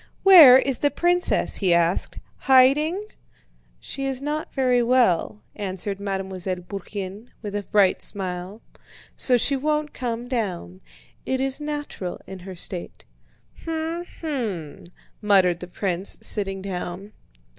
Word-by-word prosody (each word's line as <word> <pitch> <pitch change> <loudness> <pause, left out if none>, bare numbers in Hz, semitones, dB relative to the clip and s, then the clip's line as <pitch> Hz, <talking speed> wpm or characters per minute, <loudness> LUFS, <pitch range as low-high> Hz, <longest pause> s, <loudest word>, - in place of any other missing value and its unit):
"Where 325 -10 +10
is 265 -1 0
the 290 - +2
princess?" 350 +5 +1
he 185 -4 +2
asked. 170 +1 0 0.2
"Hiding?" 290 +8 +3 0.8
"She 275 - -6
is 265 -2 -2
not 295 +2 -4
very 250 -3 +2
well," 185 - +1
answered 195 0 -3
Mademoiselle 190 -2 -3
Bourienne 200 +2 -7 0.2
with 205 -1 -5
a 205 - -2
bright 200 -1 +2
smile, 185 +2 -3 0.5
"so 250 -2 +4
she 275 +4 +1
won't 300 +2 -1
come 240 -1 -4
down. 185 - -4 0.4
It 260 - -2
is 270 +2 -1
natural 295 -11 -5
in 190 -1 -9
her 185 +1 -9
state." 175 0 -5 0.6
"Hm! 325 +1 -3 0.2
Hm!" 220 - -4 0.4
muttered 190 -5 +3
the 180 - -8
prince, 185 +1 -2
sitting 195 -2 -1
down. 190 +1 -6
210 Hz, 125 wpm, -23 LUFS, 185-270 Hz, 0.8 s, Where